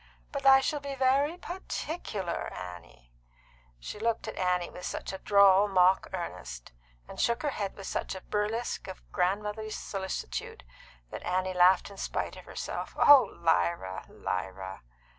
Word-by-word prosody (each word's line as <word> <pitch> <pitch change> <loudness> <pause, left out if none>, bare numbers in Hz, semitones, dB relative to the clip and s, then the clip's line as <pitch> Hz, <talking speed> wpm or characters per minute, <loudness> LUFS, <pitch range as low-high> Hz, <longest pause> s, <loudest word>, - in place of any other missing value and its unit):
But 280 -1 -1
I 270 0 +9
shall 295 +2 -1
be 280 -1 -5
very 275 +5 +2
particular, 315 - -4
Annie." 70 -10 -10 0.7
She 135 - -7
looked 230 +1 -1
at - - -5
Annie 180 -1 0
with 180 - -10
such 185 - -4
a 190 - -5
droll 200 -1 +6
mock 185 -1 +4
earnest, 60 - -6 0.4
and - - -10
shook 235 +1 +1
her 295 - +1
head 200 -6 -3
with 195 - -9
such - - -3
a 190 - -7
burlesque 210 +2 -2
of 190 - -9
grandmotherly 210 +4 -1
solicitude, 190 - -5 0.5
that - - -6
Annie 185 +1 -1
laughed 180 +2 +5
in 200 - -12
spite - - -3
of - - -12
herself. - - -5
"Oh, 285 -2 +8
Lyra, 95 - 0
Lyra!" 95 +1 -4
190 Hz, 150 wpm, -29 LUFS, 170-230 Hz, 0.7 s, I